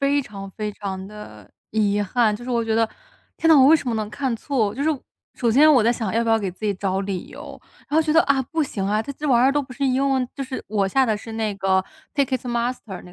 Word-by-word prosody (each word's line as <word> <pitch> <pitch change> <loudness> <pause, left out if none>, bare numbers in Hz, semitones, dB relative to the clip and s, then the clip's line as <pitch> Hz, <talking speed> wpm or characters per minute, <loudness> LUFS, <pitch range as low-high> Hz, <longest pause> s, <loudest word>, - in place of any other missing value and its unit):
非 280 +1 +2
常 195 -4 -9
非 210 0 -4
常 190 -2 -6
地 210 0 -12 0.2
遗 205 -1 +1
憾。 215 +1 +1
就 230 - -8
是 250 - -8
我 235 -2 0
觉 225 -1 0
得： 225 0 +2 0.5
“天 - - -1
呐！ 320 - +7
我 260 - +7
为 320 - +7
什 290 - -8
么 235 - 0
能 215 -1 -2
看 260 +2 -2
错”。 220 -6 -1
就 275 - -3
是 305 - +1 0.5
首 235 - 0
先 290 +7 +6
我 260 -6 +5
在 235 - +4
想 225 -5 -3
要 230 - +2
不 225 - 0
要 225 - +4
给 200 -3 -3
自 185 +4 -10
己 205 - +2
找 195 0 -2
理 195 -2 -4
由。 - - -10 0.3
然 - - -5
后 320 - +5
觉 315 -1 -1
得： 325 +2 +5
“啊！ 275 -1 +2
不 320 +5 -2
行 195 -8 -3
啊！” 210 +2 +1
这 280 - -5
这 295 +2 -4
玩 240 -1 +4
意 - - +6
儿 270 - +3
都 290 - +2
不 265 - -10
是 275 - -2
英 265 +2 +1
文 260 -2 +1
就 275 - -4
是 260 0 -6
我 200 -2 0
下 265 +6 +3
的 220 - +1
是 215 +2 -8
那 220 -2 -2
个 190 -1 +1 0.3
Ticketmaster 245 -6 -2
那 180 - -14
230 Hz, 350 characters per minute, -22 LUFS, 205-270 Hz, 0.5 s, 呐